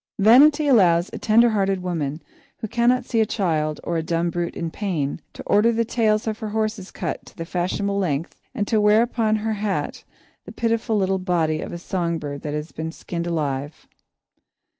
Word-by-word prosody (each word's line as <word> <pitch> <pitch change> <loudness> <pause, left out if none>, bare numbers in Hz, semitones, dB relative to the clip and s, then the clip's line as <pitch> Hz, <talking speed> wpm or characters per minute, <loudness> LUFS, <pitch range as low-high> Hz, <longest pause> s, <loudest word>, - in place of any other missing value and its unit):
Vanity 285 +9 +6
allows 180 -9 +4
a - - -5
tender 230 +2 +4
hearted 195 -3 0
woman, 160 -4 -3 0.3
who 220 - -5
cannot 240 +3 +2
see 230 - 0
a - - +3
child 155 -8 -1
or 170 - -2
a - - 0
dumb 170 +1 -1
brute 175 0 -3
in 165 -1 -4
pain, 165 -7 -2
to - - -10
order 215 +3 +3
the 230 0 0
tails 215 -2 +1
of 220 -1 -3
her 215 - -4
horses 215 -2 -2
cut - - -4
to - - -16
the 165 - -5
fashionable 185 +3 -1
length 165 -4 -2
and 205 -4 -1
to 220 -2 +2
wear 210 +2 +5
upon 225 -2 0
her 220 +1 -1
hat 205 -1 -3 0.4
the - - -9
pitiful 230 -1 0
little 190 -1 +1
body 165 -4 0
of - - -6
a - - -5
song 170 -1 -2
bird 145 -2 -6
that 150 -1 -4
has 150 +2 -5
been 160 +1 -5
skinned 170 +1 -5
alive. 145 -3 -3
190 Hz, 195 wpm, -23 LUFS, 165-220 Hz, 0.4 s, Vanity